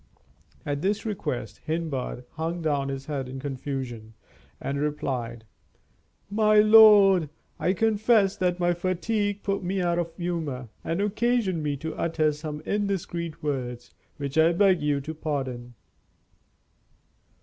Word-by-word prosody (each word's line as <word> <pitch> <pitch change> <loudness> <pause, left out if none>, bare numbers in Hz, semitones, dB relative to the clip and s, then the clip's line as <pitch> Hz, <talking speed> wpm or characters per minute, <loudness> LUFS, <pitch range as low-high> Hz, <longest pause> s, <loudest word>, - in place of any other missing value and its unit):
At 145 0 -2
this 205 +5 0
request 205 - -4
Hindbad 155 -6 -3
hung 165 +2 -3
down 140 -3 0
his 135 0 -5
head 135 -4 -4
in 135 +1 -6
confusion, 130 -5 -5 0.4
and 140 0 -3
replied: 125 -6 -3 0.8
"My 215 +1 +3
lord, 210 -6 +7 0.3
I 185 - +2
confess 215 -1 +3
that 180 -1 0
my 175 0 +2
fatigue 200 +4 -1
put 200 -1 -1
me 190 +2 -1
out 175 -1 +1
of 170 -1 -2
humor, 155 -9 -3
and 165 +4 -1
occasioned 210 -3 +1
me 145 -1 -1
to 160 +3 -5
utter 160 -2 +1
some 150 0 -6
indiscreet 180 -6 -3
words, 125 -4 -4 0.2
which 140 +1 -2
I 165 +2 +5
beg 190 0 +4
you 145 -1 +1
to 155 +3 -6
pardon." 130 -6 -4
160 Hz, 130 wpm, -26 LUFS, 140-195 Hz, 0.8 s, lord